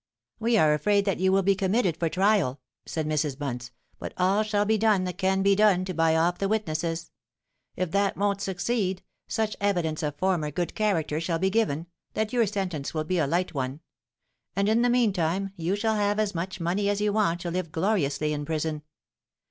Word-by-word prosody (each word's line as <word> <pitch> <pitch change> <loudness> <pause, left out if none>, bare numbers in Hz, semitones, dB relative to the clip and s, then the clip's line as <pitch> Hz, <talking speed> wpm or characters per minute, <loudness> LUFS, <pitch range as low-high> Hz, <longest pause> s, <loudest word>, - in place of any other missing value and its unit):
'We 230 +1 +2
are 155 -6 +5
afraid 200 +6 +2
that 195 -4 0
you 190 +1 +3
will 195 0 +3
be 195 +1 +4
committed 190 -1 +1
for 165 0 -1
trial,' 185 -8 +2 0.3
said 160 -2 -2
Mrs. 150 -3 -1
Bunce; 125 -4 -4 0.3
'but - - -7
all 190 +3 +3
shall 210 -1 +1
be 220 +1 +2
done 210 -3 +3
that 180 -1 -5
can 190 0 +2
be 200 0 +4
done 195 -3 +4
to 185 - -4
buy 165 -1 +2
off 170 +2 +1
the 195 - 0
witnesses. 165 -5 -2 0.6
If 185 -2 -2
that 200 +1 +1
won't 200 0 0
succeed, 190 0 -1 0.2
such 220 -1 -1
evidence 175 -6 0
of 150 -2 -2
former 175 -3 0
good 175 +4 -3
character 165 -8 0
shall 165 0 -1
be 190 +3 +1
given, 190 -8 0 0.3
that 220 +1 -1
your 235 -3 +3
sentence 180 -8 -3
will 155 - 0
be 180 +3 -1
a 155 - +2
light 175 +5 0
one; 135 0 -3 0.8
and 200 +1 +1
in 220 +2 +3
the 245 - +3
meantime 195 -6 +1
you 175 +2 -1
shall 220 +1 0
have 205 0 +1
as 210 -2 0
much 180 +2 -4
money 185 +4 0
as 205 0 0
you 210 0 +1
want 175 -6 +1
to 175 - -3
live 180 -2 -3
gloriously 155 -6 0
in 145 0 -3
prison. 155 0 -2
185 Hz, 205 wpm, -26 LUFS, 160-205 Hz, 0.8 s, are